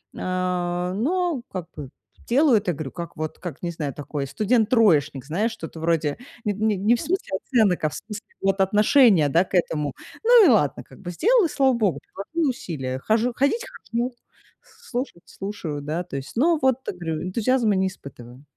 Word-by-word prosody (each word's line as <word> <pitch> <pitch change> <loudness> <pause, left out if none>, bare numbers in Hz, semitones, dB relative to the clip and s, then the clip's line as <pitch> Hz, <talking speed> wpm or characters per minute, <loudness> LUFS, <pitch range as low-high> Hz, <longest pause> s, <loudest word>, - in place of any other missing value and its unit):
э. 180 -1 -1
Но 325 - 0
как 180 -3 -5
бы 145 -4 -7 0.4
делаю 265 0 +4
это, 195 -4 -1
говорю, 145 -3 -6
как 170 -1 -7
вот, 155 0 -5
как 175 -6 -7
не 175 - -2
знаю, 150 -5 -4
такой 145 0 -5
студент-троечник, 205 - +2
знаешь, 205 +11 0
что-то 165 -7 -8
вроде 160 -3 0 0.3
не 210 - +1
не 215 +1 +1
-не 210 +5 +3
в 235 - -4
смысле 345 - -2
оценок, 215 - +2
а - - +2
в - - -12
смысле 210 0 -8 0.2
вот 195 0 +1
отношения, 210 - +5
да, 165 +5 +4
к - - -20
этому. 150 -5 0 0.3
Ну 470 -2 +7
и - - +6
ладно 195 - +2
как - - -17
бы- 175 -2 -6
сделала, 445 - +3
и - - -1
слава 270 -3 +3
богу, 215 -7 +1
приложила 310 - -3
усилия, 135 - -4
хожу 225 - +1
ходить- 285 - +1 0.3
хожу, 240 +2 -1 0.5
слушать- 270 - -6
слушаю, 170 -7 -6
да. 155 +5 -3
То 170 -6 -6
есть, 135 +1 -8
ну 320 +8 +3
вот, 260 -2 +3
э, - - 0
говорю, 165 -3 -4
энтузиазма 220 +3 +1
не 190 0 +2
испытываю. 130 -7 -11
190 Hz, 185 wpm, -24 LUFS, 160-240 Hz, 0.5 s, Ну